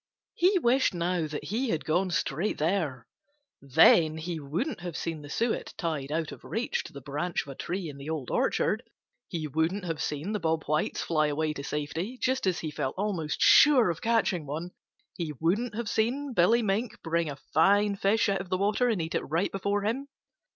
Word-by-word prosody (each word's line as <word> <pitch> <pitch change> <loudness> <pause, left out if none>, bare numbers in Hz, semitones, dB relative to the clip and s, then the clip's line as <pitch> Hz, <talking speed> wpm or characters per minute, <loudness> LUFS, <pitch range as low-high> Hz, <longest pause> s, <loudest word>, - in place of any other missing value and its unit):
He 370 +3 +3
wished 260 - +2
now 170 -1 0
that 150 -1 -5
he 240 +5 -1
had 160 - -1
gone 180 +4 +1
straight 170 +3 -1
there. 155 - -1 0.6
Then 155 +3 +5
he 165 +1 -4
wouldn't 165 - -3
have 175 -2 -5
seen 165 -2 -4
the 145 - -10
suet 230 +8 -1
tied 150 -5 -3
out 160 0 -1
of - - -11
reach 230 +3 -2
to - - -10
the 140 - -8
branch 150 +6 -2
of - - -13
a - - -5
tree 180 +4 -4
in 145 -2 -8
the 140 +2 -8
Old 155 -6 -3
Orchard; - - +1 0.5
he 160 -2 -4
wouldn't 160 +7 -1
have 165 -3 -3
seen 150 +7 -3
the 210 - -1
Bob 160 -2 0
Whites 155 +1 -1
fly 155 -2 +1
away 155 +1 -1
to 140 - -7
safety 160 - -3
just 260 -5 0
as 180 -2 0
he 155 - -4
felt 145 -3 -3
almost 185 -7 -2
sure 260 -10 +7
of 165 - -7
catching 220 -9 +1
one; 160 +5 -4 0.5
he 165 -4 -3
wouldn't 210 +8 0
have 235 0 -3
seen 255 +7 0
Billy 230 +5 +4
Mink 215 +3 -1
bring 165 -1 0
a 145 - -5 0.2
fine 200 +5 +4
fish 200 +3 +2
out 195 -2 0
of 185 - -9
the 185 - +1
water 210 +5 +2
and 220 -5 0
eat 160 - -5
it - - +1
right 165 +5 0
before 200 +1 -1
him. 250 +7 -1
175 Hz, 205 wpm, -28 LUFS, 155-210 Hz, 0.6 s, sure